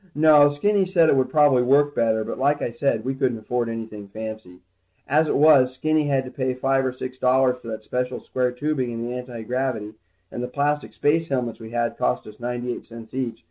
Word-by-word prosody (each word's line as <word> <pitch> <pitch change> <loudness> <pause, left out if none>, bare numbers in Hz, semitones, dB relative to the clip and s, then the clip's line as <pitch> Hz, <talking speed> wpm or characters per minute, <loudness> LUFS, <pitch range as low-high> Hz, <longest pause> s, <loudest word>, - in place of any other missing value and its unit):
No, 150 -1 +6
Skinny 195 +8 +1
said 170 -4 +4
it - - +4
would 130 -1 +1
probably 145 -4 +4
work 145 +3 +3
better, 110 -3 +1
but - - -6
like 145 +2 +2
I - - -2
said, 120 -2 -1
we 135 - -1
couldn't 130 -3 -1
afford 120 +2 -2
anything 110 -3 -7
fancy. 110 -3 -8 0.5
As 155 +3 +3
it - - +1
was, 140 -4 +5
Skinny 155 +2 +1
had 135 -2 +1
to 125 - -8
pay 130 -2 -2
five 135 +1 +1
or 130 - 0
six 130 0 -7
dollars 130 0 +2
for 115 - -13
that 110 -1 -6
special 125 +3 -3
square 125 -1 -1
tubing 130 0 -2
in 115 0 -4
the 120 +1 -4
antigravity, 125 -2 -4 0.4
and 120 - -5
the 125 - -3
plastic 145 +3 -1
space 160 +2 +1
helmets 125 -4 -2
we 110 -1 -9
had 120 0 -2
cost 60 0 0
us 105 0 -13
ninety 120 0 -3
eight - - -9
cents 115 0 -12
each. 130 -3 -3
125 Hz, 220 wpm, -23 LUFS, 115-145 Hz, 0.5 s, No